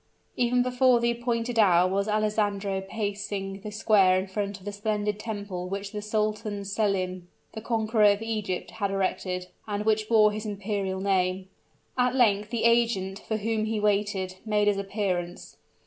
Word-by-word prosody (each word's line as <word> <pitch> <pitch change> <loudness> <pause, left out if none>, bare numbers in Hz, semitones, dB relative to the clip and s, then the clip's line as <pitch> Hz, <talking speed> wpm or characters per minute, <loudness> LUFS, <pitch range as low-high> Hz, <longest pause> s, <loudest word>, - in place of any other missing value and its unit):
Even 245 0 +2
before 250 0 +3
the 235 0 +2
appointed 235 0 -1
hour 180 -4 +5
was 200 +2 0
Alessandro 210 -2 0
pacing 200 -1 -4
the 210 - -6
square 205 -3 +4
in 185 - -1
front 200 0 -3
of 190 - -17
the 205 - -3
splendid 210 0 -2
temple 200 -5 -5
which 200 +1 -4
the 210 - -5
Sultan 210 -1 -2
Selim 190 -3 -1 0.3
the 220 - -6
conqueror 220 -1 +1
of 205 +1 +4
Egypt 215 -5 -3
had 200 -3 -2
erected, 185 -1 -2 0.2
and 205 0 -3
which 215 -1 +1
bore 215 -2 +5
his 210 0 -5
imperial 200 -2 -3
name. 190 -1 0 0.5
At 250 0 +2
length 210 -5 +3
the 235 -1 -2
agent, 230 -5 +2
for 220 - -3
whom 220 0 -1
he 220 0 -1
waited, 200 -3 0
made 210 -1 +1
his 205 -1 +3
appearance. 190 -3 -3
205 Hz, 165 wpm, -27 LUFS, 195-220 Hz, 0.5 s, hour